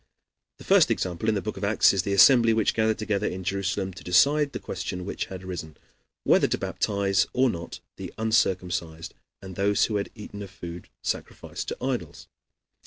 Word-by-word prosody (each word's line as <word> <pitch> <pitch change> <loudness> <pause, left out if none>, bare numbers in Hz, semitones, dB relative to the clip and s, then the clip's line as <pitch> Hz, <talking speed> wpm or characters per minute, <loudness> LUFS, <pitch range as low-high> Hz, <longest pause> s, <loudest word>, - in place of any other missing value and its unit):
The - - -13
first - - +5
example 90 +4 -1
in 110 - +2
the 100 - -2
book 105 - -5
of 95 - -7
Acts 100 0 +4
is 95 - +1
the 100 - -3
assembly 115 +4 +6
which 110 -2 +2
gathered 110 -1 +1
together 105 -2 -1
in 95 0 -5
Jerusalem 95 0 -2
to 95 - -12
decide 140 +11 +3
the - - -4
question 90 0 -5
which - - -3
had 95 -1 -9
arisen, 85 -4 -7 0.5
whether - - +4
to - - -1
baptize 100 -2 0
or 130 -1 +3
not 85 -3 -7 0.2
the - - -7
uncircumcised 90 -7 -1 0.3
and 95 -1 -8
those 100 +2 +2
who 105 - -1
had 100 - -3
eaten 105 -2 -9
of 100 - -7
food 85 -2 -9
sacrificed - - -5
to - - -4
idols. - - -3
100 Hz, 185 wpm, -26 LUFS, 90-110 Hz, 0.5 s, assembly